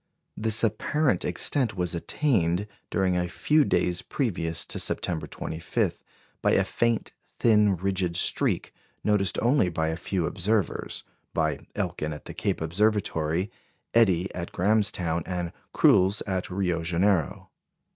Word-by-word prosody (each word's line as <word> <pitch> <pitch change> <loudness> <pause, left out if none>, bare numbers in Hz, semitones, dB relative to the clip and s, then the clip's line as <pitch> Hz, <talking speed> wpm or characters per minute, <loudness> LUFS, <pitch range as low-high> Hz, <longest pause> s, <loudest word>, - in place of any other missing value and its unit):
This 110 +1 +3
apparent 115 - +1
extent 110 +6 +1
was 90 -1 0
attained, 90 - 0 0.2
during 95 -2 +1
a 90 0 0
few 145 - +2
days 90 -9 +1
previous 85 - -2
to - - -4
September 85 -3 -1
25, 80 +1 -3 0.4
by - - +3
a - - +4
faint, 115 -1 0 0.3
thin, 105 -3 +4
rigid 95 -1 -1
streak, 85 - +1 0.3
noticed 100 -4 +1
only 120 -6 +3
by 80 -1 -1
a 80 - -1
few 90 0 -2
observers 100 +3 -1 0.3
by 80 -3 -1
Elkin 75 0 -2
at 75 - -10
the - - -7
Cape - - -2
Observatory, 90 -1 0 0.4
Eddie 95 -6 +3
at 85 -1 -5
Grahamstown, 90 -4 +1
and 90 -2 -3 0.2
Cruls 95 +3 +4
at 95 -2 -2
Rio 90 -3 -1
Janeiro. 85 0 0
90 Hz, 130 wpm, -26 LUFS, 85-105 Hz, 0.4 s, a